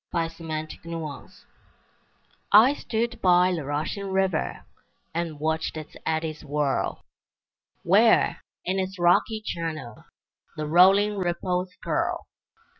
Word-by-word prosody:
Y 165 -2 0
Z 165 0 -13
Never 155 -1 -2
and 155 - -9
Forever 165 -4 -6 1.2
I 225 +7 +7
stood 235 -3 -3
by 180 0 +4
the 165 -4 -3
rushing 155 +8 -3
river, 190 -3 -1 0.5
And 165 -3 -3
watched 160 +1 -1
its 155 -1 -9
eddies 160 -1 -2
whirl, 145 -2 -1 0.8
Where, - - +4 0.2
in 190 +2 0
its 190 +1 -3
rocky 175 +5 +3
channel, 155 -9 -5 0.5
The 155 - -2
rolling 195 +6 +5
ripples 180 +1 -1
curl. - - -1
170 Hz, 115 wpm, -25 LUFS, 155-190 Hz, 1.2 s, I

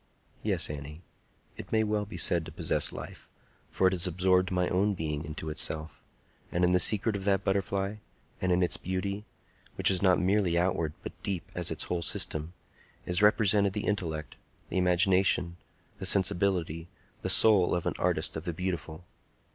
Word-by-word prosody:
Yes, - - 0
Annie; 75 +3 -8 0.5
it - - -10
may 110 0 +2
well 105 -1 -1
be 105 - -9
said 85 -2 +3
to - - -9
possess - - +1
life, - - -10 0.4
for - - 0
it 95 - +4
has 90 -1 0
absorbed 90 +1 +2
my 90 -1 0
own 100 +3 +1
being 75 -3 -3
into 75 +1 -6
itself; 80 +1 -3 0.5
and 90 - 0
in 90 - +4
the 90 - +4
secret 105 +2 +4
of 100 - -4
that 100 -1 +1
butterfly, 100 +1 -1 0.4
and 90 - 0
in 90 +1 +2
its 90 - +1
beauty,—which 100 +3 -3
is 95 - 0
not 95 -2 +4
merely 95 -2 +1
outward, 85 -3 0
but - - -6
deep 95 -4 -3
as - - -2
its - - -2
whole 90 -1 -3
system,—is 85 +3 -3
represented 105 -2 +4
the 105 - -3
intellect, 80 -7 -3 0.3
the - - -1
imagination, 90 -1 +2 0.4
the 95 - -1
sensibility, 90 -4 +1 0.3
the - - -3
soul 100 -6 +6
of 90 - -3
an - - 0
Artist - - 0
of 80 +2 -6
the 85 - -3
Beautiful! 90 -1 -5
90 Hz, 170 wpm, -29 LUFS, 85-100 Hz, 0.5 s, soul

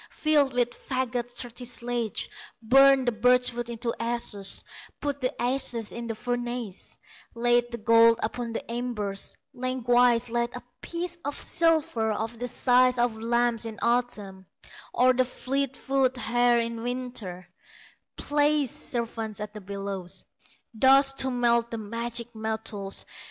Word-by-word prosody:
Filled 295 -3 +2
with 245 -1 +1
faggots 245 -2 -3
thirty 245 0 -5
sledges, 240 -2 -2 0.3
Burned 270 +3 +5
the - - +4
birch 250 +2 +3
wood 240 0 -4
into 235 0 -3
ashes; 230 -4 -1 0.4
Put 285 -1 -3
the 255 - -2
ashes 245 -3 +1
in 235 0 -5
the 225 - -3
furnace, 240 -4 -4 0.4
Laid 240 +1 +2
the 235 - -3
gold 230 0 +5
upon 235 +1 -3
the - - -5
embers, 220 -5 -3 0.2
Lengthwise 245 -1 +2
laid 235 +1 -1
a 250 - -7 0.2
piece 345 0 -4
of 285 0 -4
silver 315 -10 +1
Of 225 +2 -4
the 245 - -2
size 250 +1 +3
of 240 -1 +1
lambs 235 0 +1
in 220 -1 -7
autumn, 210 -6 -1 0.4
Or 255 +1 +4
the 255 +1 +3
fleet 265 +1 -2
foot 265 -1 +1
hare 240 0 +3
in 230 0 -3
winter; 240 -8 -4 0.7
Places 290 -2 +1
servants 225 -3 -4
at 210 0 -6
the 210 - -8
bellows, 195 -2 -5 0.5
Thus 270 +4 +5
to 265 -1 0
melt 235 -2 +2
the 230 - -4
magic 235 +2 -3
metals. 220 -3 -3
240 Hz, 140 wpm, -27 LUFS, 225-250 Hz, 0.7 s, Burned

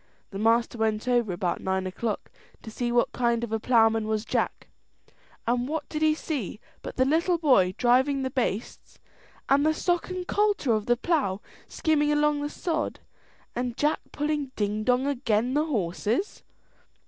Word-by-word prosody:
The 195 - -5
master 230 +2 +2
went 220 +1 0
over 240 -5 +2
about 175 0 -2
nine 190 0 -1
o'clock 205 +3 -4 0.3
to 220 - -8
see 240 +2 -2
what 240 0 +2
kind 235 -1 0
of 235 - -4
a 225 - 0
ploughman 225 -2 +3
was 215 0 -1
Jack, - - -2 0.8
and 245 +1 0
what 310 0 -3
did 305 - -4
he 310 0 +4
see 275 - -4 0.2
but - - -7
the 260 - +3
little 335 +5 +2
boy 225 - +3
driving 260 +3 +3
the 260 - -2
bastes, 240 -4 -3 0.5
and 280 +1 +4
the 310 +1 +2
sock 350 +2 0
and 365 0 -5
coulter 410 - +2
of 215 -1 -1
the 240 0 +3
plough 250 - 0 0.3
skimming 300 -2 +1
along 295 0 +2
the 290 - -2
sod, 315 -1 -3 0.5
and 245 0 -3
Jack 300 +1 +1
pulling 295 -2 -2
ding 210 0 -1
dong 250 +3 +2
again' 245 -3 0
the 300 +2 +2
horses. 225 - -1
250 Hz, 170 wpm, -26 LUFS, 220-295 Hz, 0.8 s, he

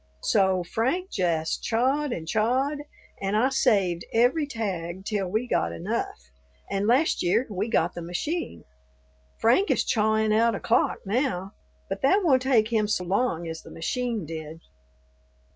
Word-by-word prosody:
So 190 -2 +2
Frank 260 - -1
jest 165 -4 -1
chawed 265 +5 +1
and 160 -8 -4
chawed, 255 - +1 0.4
and 195 +2 0
I 250 +5 +3
saved 200 -10 +2
every 250 +7 +2
tag 190 -7 -4
till 200 -3 -1
we 215 +6 -1
got 85 - 0
enough, 85 - -3 0.5
and 200 +1 0
last 265 +7 +3
year 180 +8 +2
we 205 +3 -2
got - - +1
the 175 - -6
machine. 175 - -4 0.8
Frank 250 - +3
is - - +2
chawin' 220 -1 +2
out 230 0 +3
a - - -4
clock - - +1
now; 195 -4 -1 0.4
but 195 0 -4
that 385 +9 +3
won't 265 -7 +4
take 240 -5 +3
him 220 -3 +1
so 205 -3 0
long 180 -2 0
as 160 0 -6
the - - -13
machine 230 +3 -3
did." 160 0 -7
215 Hz, 155 wpm, -26 LUFS, 180-250 Hz, 0.8 s, won't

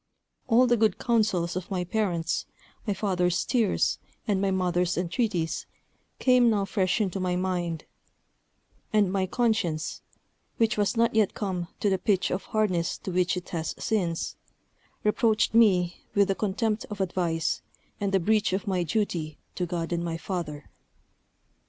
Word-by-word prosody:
All 250 +1 +5
the 240 -1 +3
good 220 -1 +2
counsels 210 -8 +1
of 185 -1 -4
my 185 -3 -1
parents, 175 -4 -1 0.4
my 205 - +2
father's 180 -3 +1
tears 230 -6 +1 0.3
and 200 -3 +1
my 200 - +2
mother's 180 -2 +1
entreaties, 180 -2 -1 0.5
came 250 -2 +5
now 205 -3 +1
fresh 190 0 +1
into 195 -3 -1
my 180 -1 0
mind; 180 -3 -2 1.1
and 210 -3 +3
my 190 -1 0
conscience, 205 -9 0 0.6
which 225 -1 +2
was 205 +2 0
not 230 0 +3
yet 220 -3 +2
come 185 -4 -2
to 205 - +3
the 190 - +1
pitch 190 0 +1
of 185 - -2
hardness 185 -6 0
to 190 - -6
which 180 +1 +1
it 180 - -6
has 165 -2 -3
since, 175 -7 -1 0.7
reproached 215 +1 +2
me 185 -6 +4 0.2
with 200 -1 +4
the - - +4
contempt 210 +2 -1
of 210 -1 -6
advice, 175 -3 0 0.4
and 200 -1 -1
the 195 - +3
breach 210 +2 +2
of 190 0 -1
my 185 -3 0
duty 170 -4 -1 0.2
to 180 - -2
God 170 -1 -2
and 170 0 -1
my 165 -1 -2
father. 165 -5 -5
190 Hz, 155 wpm, -27 LUFS, 175-215 Hz, 1.1 s, All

